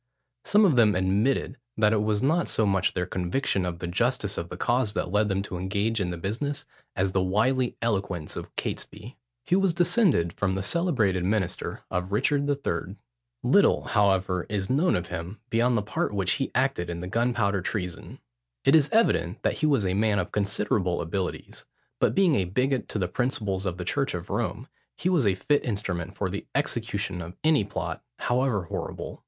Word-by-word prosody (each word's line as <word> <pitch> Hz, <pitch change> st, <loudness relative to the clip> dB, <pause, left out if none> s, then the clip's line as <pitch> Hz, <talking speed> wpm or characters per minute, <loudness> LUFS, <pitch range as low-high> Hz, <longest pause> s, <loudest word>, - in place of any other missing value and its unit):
Some 210 Hz, +1 st, +5 dB
of 155 Hz, -10 st, +3 dB
them 110 Hz, -4 st, +5 dB
admitted, 100 Hz, +8 st, +1 dB, 0.2 s
that 105 Hz, 0 st, +4 dB
it 105 Hz, -, +2 dB
was 105 Hz, 0 st, 0 dB
not 165 Hz, +5 st, +2 dB
so 110 Hz, -, +1 dB
much 95 Hz, -2 st, +1 dB
their 90 Hz, -1 st, 0 dB
conviction 90 Hz, +2 st, -1 dB
of 85 Hz, -1 st, -4 dB
the 85 Hz, -, -5 dB
justice 105 Hz, +3 st, 0 dB
of 85 Hz, -, -4 dB
the -, -, -7 dB
cause 120 Hz, -3 st, +1 dB
that 90 Hz, -, -2 dB
led 105 Hz, +1 st, +2 dB
them 95 Hz, 0 st, 0 dB
to 90 Hz, -3 st, -5 dB
engage 100 Hz, +4 st, 0 dB
in 90 Hz, -3 st, -1 dB
the 90 Hz, -, -4 dB
business, 115 Hz, -, -3 dB, 0.3 s
as 95 Hz, 0 st, +1 dB
the 95 Hz, -, +1 dB
wily 120 Hz, +7 st, +1 dB
eloquence 95 Hz, -8 st, -2 dB
of -, -, -8 dB
Catesby. 120 Hz, +5 st, -5 dB, 0.3 s
He 175 Hz, -, +1 dB
was 190 Hz, -3 st, +2 dB
descended 175 Hz, -, +3 dB
from 95 Hz, -2 st, -1 dB
the 95 Hz, -, -2 dB
celebrated 110 Hz, -, +1 dB
minister 95 Hz, -2 st, -1 dB
of 90 Hz, +1 st, -2 dB
Richard 140 Hz, +6 st, +1 dB
III. 140 Hz, -1 st, -2 dB, 0.5 s
Little, -, -, +4 dB
however, 95 Hz, -3 st, +1 dB
is 100 Hz, -1 st, -1 dB
known 165 Hz, +7 st, +3 dB
of 90 Hz, -, -1 dB
him 85 Hz, +6 st, -6 dB
beyond 120 Hz, +1 st, +3 dB
the 105 Hz, -, 0 dB
part 105 Hz, 0 st, -2 dB
which 95 Hz, -2 st, +1 dB
he 135 Hz, -, 0 dB
acted 130 Hz, -9 st, +1 dB
in 85 Hz, 0 st, -4 dB
the 90 Hz, -, -5 dB
Gunpowder 115 Hz, -2 st, +1 dB
Treason. 90 Hz, -, -4 dB, 0.5 s
It -, -, +5 dB
is 150 Hz, -3 st, +5 dB
evident 225 Hz, +1 st, +2 dB
that -, -, +2 dB
he 155 Hz, -, +2 dB
was 135 Hz, -9 st, +2 dB
a 90 Hz, -, +1 dB
man 105 Hz, +1 st, +2 dB
of -, -, -2 dB
considerable 100 Hz, -3 st, 0 dB
abilities; 90 Hz, +3 st, -4 dB, 0.3 s
but -, -, +2 dB
being 190 Hz, -4 st, +4 dB
a 95 Hz, -, +1 dB
bigot 125 Hz, +7 st, 0 dB
to -, -, -2 dB
the 95 Hz, -3 st, 0 dB
principles 100 Hz, -3 st, -1 dB
of 90 Hz, -1 st, -3 dB
the 90 Hz, -, -5 dB
church -, -, 0 dB
of -, -, -6 dB
Rome, -, -, -2 dB, 0.3 s
he 175 Hz, -, 0 dB
was 160 Hz, -, +3 dB
a 95 Hz, -, +3 dB
fit 145 Hz, +9 st, +1 dB
instrument 95 Hz, -5 st, -3 dB
for 95 Hz, -, 0 dB
the 100 Hz, +2 st, -5 dB
execution 110 Hz, -9 st, -1 dB
of 85 Hz, +2 st, -8 dB
any 155 Hz, -6 st, +4 dB
plot, 90 Hz, -4 st, -5 dB
however 120 Hz, -5 st, 0 dB
horrible. 85 Hz, -, -6 dB
105 Hz, 195 wpm, -26 LUFS, 95-130 Hz, 0.5 s, Some